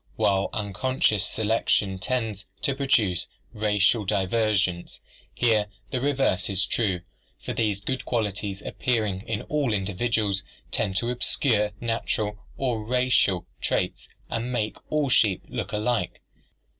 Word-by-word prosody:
While 95 -1 +2
unconscious 105 0 +1
selection 105 -3 +1
tends 110 -4 -2 0.2
to 140 - +2
produce 120 -10 +2 0.3
racial 105 +1 +3
divergence, 95 -2 +1 0.3
here 110 -3 +3 0.2
the 130 - -1
reverse 135 -10 +1
is 95 0 +1
true, 95 -6 0 0.4
for - - -2
these 105 -3 0
good 130 +5 -2
qualities 105 -4 -2
appearing 110 -6 0
in 110 -2 -2
all 145 -5 0
individuals 105 0 0 0.3
tend 95 - 0
to 120 +5 0
obscure 115 -4 +1
natural 110 -2 -1 0.2
or 120 -5 0
racial 125 -6 +2 0.2
traits - - -1 0.2
and 115 +2 -2
make 110 -4 -1 0.2
all 150 -2 +2
sheep 105 -6 +3
look - - -4
alike. 110 +3 0
105 Hz, 120 wpm, -26 LUFS, 100-120 Hz, 0.4 s, racial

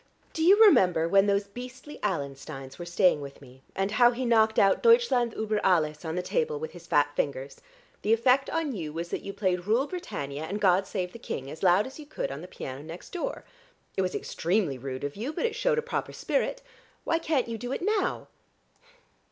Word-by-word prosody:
Do 320 - -3
you 380 +6 +6
remember 180 - +5
when 195 +3 +4
those 200 0 +2
beastly 250 +7 -10
Allensteins 135 -7 -4
were 175 - -6
staying 175 -3 +3
with 140 -1 -9
me, 130 -1 -16
and 195 +1 -1
how 240 +3 +6
he 250 +1 -3
knocked 220 -2 +3
out 195 -1 +4
'Deutschland 460 - +4
über 215 -1 -1
alles,' 155 -4 +2
on 160 0 -3
the 180 - -2
table 465 - -1
with 470 +1 -5
his - - -13
fat - - +2
fingers? - - -3 0.4
The 210 - 0
effect 250 +4 +3
on 325 -3 -1
you 160 -6 -4
was 170 +2 -5
that - - -3
you 200 - -6
played 185 -2 -1
'Rule 235 +6 +3
Britannia' 155 - -5
and 200 +6 -4
'God 190 -1 +3
Save 180 -2 -3
the 235 - -9
King' 135 - -5
as 160 - -10
loud 185 +3 +4
as 265 - -10
you 300 - -10
could 295 - -4
on 140 +2 -6
the 180 - -9
piano 130 -6 -7
next 165 +3 -10
door. 375 +8 -4 0.5
It - - +1
was 185 -1 -1
extremely 170 -6 -1
rude 130 +1 -6
of 145 0 -4
you, 230 +8 -4
but 470 - -1
it 460 - 0
shewed - - +1
a 465 - 0
proper 485 - -3
spirit. - - -1 0.4
Why 330 - +1
can't 300 -7 0
you 230 -1 -5
do 245 +3 -5
it 270 - -3
now?" 415 -1 0
205 Hz, 215 wpm, -28 LUFS, -, 0.5 s, you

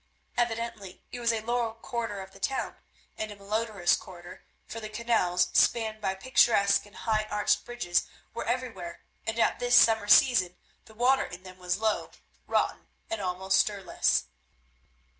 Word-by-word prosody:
Evidently 230 -5 -3
it 245 - -6
was 235 -1 +2
a 225 -1 -2
low 235 0 -1
quarter 225 -3 -4
of 190 0 -10
the 195 - -16
town 265 +6 -2 0.5
and 215 - -3
a - - -8
malodourous 200 -3 0
quarter, 175 -1 -11 0.2
for 225 - -7
the 215 -1 -7
canals, 215 -6 +1
spanned 220 -2 +2
by 190 -2 -1
picturesque 200 -2 +3
and 205 - -19
high 215 -2 +1
arched 210 0 +1
bridges, 240 -8 -1 0.3
were 235 - -4
everywhere, 230 -8 -4 0.2
and 225 +1 -2
at 230 - +2
this 245 0 +3
summer 220 -3 +5
season 190 -8 +5 0.3
the 220 - -17
water 255 +4 +3
in 180 +1 -10
them 185 0 -12
was 180 0 -1
low, 220 0 0 0.4
rotten, - - 0 0.2
and 225 -2 -2
almost 190 +1 +1
stirless. 200 - +1
215 Hz, 160 wpm, -28 LUFS, 190-235 Hz, 0.5 s, summer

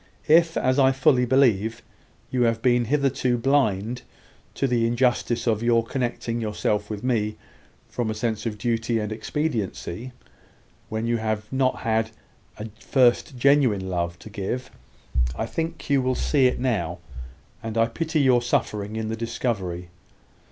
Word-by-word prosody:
If, 165 +1 +5
as 130 +2 +2
I 135 -1 +6
fully 130 -1 +3
believe, 115 -3 +2 0.5
you 125 - 0
have 115 -1 +1
been 120 -1 +3
hitherto 135 -2 +1
blind 120 -3 +1 0.5
to - - 0
the 120 -3 +2
injustice 120 0 +1
of 110 -3 +1
your 115 -1 +3
connecting 120 -2 -2
yourself 105 -1 -1
with 105 -1 -5
me, 110 -4 0 0.5
from 120 -3 -3
a 110 - -2
sense 110 0 -2
of 105 -2 -4
duty 115 +1 0
and 105 -1 -2
expediency, 115 - -3 0.8
when 110 +1 -2
you 120 0 +1
had 110 -1 -2
not 130 -1 +1
a 110 0 +1 0.7
first 130 +2 +2
genuine 125 -8 +3
love 85 -1 -2
to 110 - -12
give, 100 +6 -4 0.6
I 110 - -2
think 165 +7 -4
you 140 -3 +3
will 130 0 0
see 135 -1 +3
it 125 - -1
now; 110 -9 -1 0.6
and 115 0 -5
I 115 - +5
pity 155 +6 -1
your 130 -3 +4
suffering 105 -3 -1
in 110 0 -2
the 110 - -2
discovery. 100 -7 -3
115 Hz, 150 wpm, -24 LUFS, 110-130 Hz, 0.8 s, I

